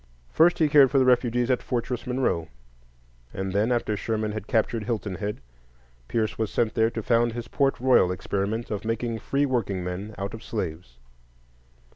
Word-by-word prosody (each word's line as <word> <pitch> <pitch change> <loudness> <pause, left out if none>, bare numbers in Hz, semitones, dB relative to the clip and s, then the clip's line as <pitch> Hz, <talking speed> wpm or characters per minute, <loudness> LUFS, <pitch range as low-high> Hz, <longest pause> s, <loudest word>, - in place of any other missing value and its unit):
First, 170 +2 +4
he 160 - +3
cared 145 -2 +6
for 140 - +1
the 130 - +4
refugees 125 0 +2
at 125 - +1
Fortress 125 0 -3
Monroe; 125 -11 0 0.9
and 95 0 -3
then, 105 +4 +2
after 120 -3 0
Sherman 110 0 -2
had 105 -1 -6
captured 110 -1 0
Hilton 110 -4 -2
Head, 100 +4 -4 0.7
Pierce 110 - -1
was 110 -2 0
sent 115 +2 0
there 115 -1 +3
to 115 -1 -5
found 120 0 +2
his 120 0 -5
Port 135 -1 +1
Royal 125 -8 +4
experiment 100 +5 -3
of 105 - -3
making 115 +1 -2
free 140 +5 0
workingmen 100 -5 -3
out 100 +1 -4
of 115 - -8
slaves. 80 - -5
115 Hz, 170 wpm, -26 LUFS, 100-125 Hz, 0.9 s, cared